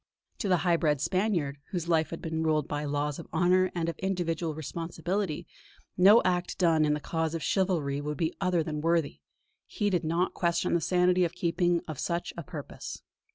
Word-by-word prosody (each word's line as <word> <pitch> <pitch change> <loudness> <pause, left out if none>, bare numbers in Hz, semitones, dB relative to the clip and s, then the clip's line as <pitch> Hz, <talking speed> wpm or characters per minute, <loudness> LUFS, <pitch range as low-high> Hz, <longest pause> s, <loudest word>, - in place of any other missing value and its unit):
To 205 - -1
the 180 - +4
high 170 -1 +4
bred 150 -4 +1
Spaniard, 165 -3 0
whose 175 -3 -3
life 160 -2 +2
had 165 - -7
been 160 0 -2
ruled 155 -2 +1
by 145 0 -3
laws 145 +1 -1
of 170 - -9
honour 180 +3 +3
and 165 -1 -1
of 170 - -4
individual 170 -4 -1
responsibility, 165 +3 -3 0.5
no 200 +5 +7
act 180 -1 0
done 165 -4 +3
in 150 0 +2
the - - -3
cause 160 +1 -2
of 165 - -4
chivalry 165 -8 0
could 150 0 -4
be 160 +2 0
other 180 -3 +2
than 150 -1 -4
worthy; 165 -2 +1 0.5
he 205 -3 -1
did 180 -2 +1
not 170 +3 0
question 170 -2 0
the 170 - +2
sanity 180 +2 +3
of 170 -1 0
the - - -19
keeping 175 0 +1
of 155 -4 -6
such 170 0 -2
a 170 - -5
purpose. 150 - -8
170 Hz, 200 wpm, -29 LUFS, 155-180 Hz, 0.5 s, no